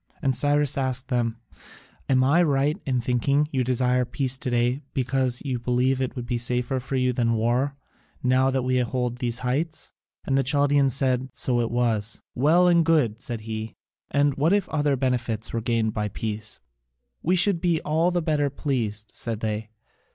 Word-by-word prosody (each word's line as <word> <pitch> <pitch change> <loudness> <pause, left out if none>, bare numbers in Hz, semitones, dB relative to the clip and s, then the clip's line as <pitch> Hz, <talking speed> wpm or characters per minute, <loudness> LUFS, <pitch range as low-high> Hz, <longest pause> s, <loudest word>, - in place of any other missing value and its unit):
And 135 -4 0
Cyrus 145 0 +2
asked 130 0 -2
them: 120 -2 0 0.7
"Am 130 -1 +4
I 145 +7 +4
right 145 -2 +2
in 130 -2 +1
thinking 125 +4 +1
that 150 - -7
you 130 -1 +1
desire 125 0 +1
peace 130 +1 0
to 145 - -2
day 120 +3 +1
because 130 -1 0
you 130 -3 -2
believe 125 +2 +1
it 130 - -2
will 125 - -4
be 120 0 -2
safer 125 +2 -1
for 135 +2 -5
you 125 -1 +1
than 115 -1 +1
war, 120 +5 0 0.5
now 130 +1 +3
that 130 -1 0
we 130 0 +1
hold 125 0 -2
these 120 -2 +1
heights?" 155 +6 -2 0.3
And 135 - 0
the 135 - +3
Chaldaeans 140 0 +2
said 130 -2 +1
that 130 -1 -11
so 125 -2 +1
it 115 - -1
was. 115 -3 -1
"Well 160 +8 +4
and 170 -1 +5
good," 140 -9 +1
said 120 -5 -5
he. 110 0 -6 0.3
"And 145 0 +2
what 155 +6 +3
if 205 -2 +1
other 145 -2 +1
benefits 120 -4 -2
were 115 - -1
gained 115 -2 0
by 105 -1 -1
peace?" 105 +1 -5 0.6
"We 180 +3 +2
should 180 -1 +3
be 170 -3 +2
all 160 +3 +1
the 175 -1 -1
better 150 -3 +1
pleased," 115 -7 -2
said 115 -2 -4
they. 110 0 -3
130 Hz, 190 wpm, -25 LUFS, 120-140 Hz, 0.7 s, and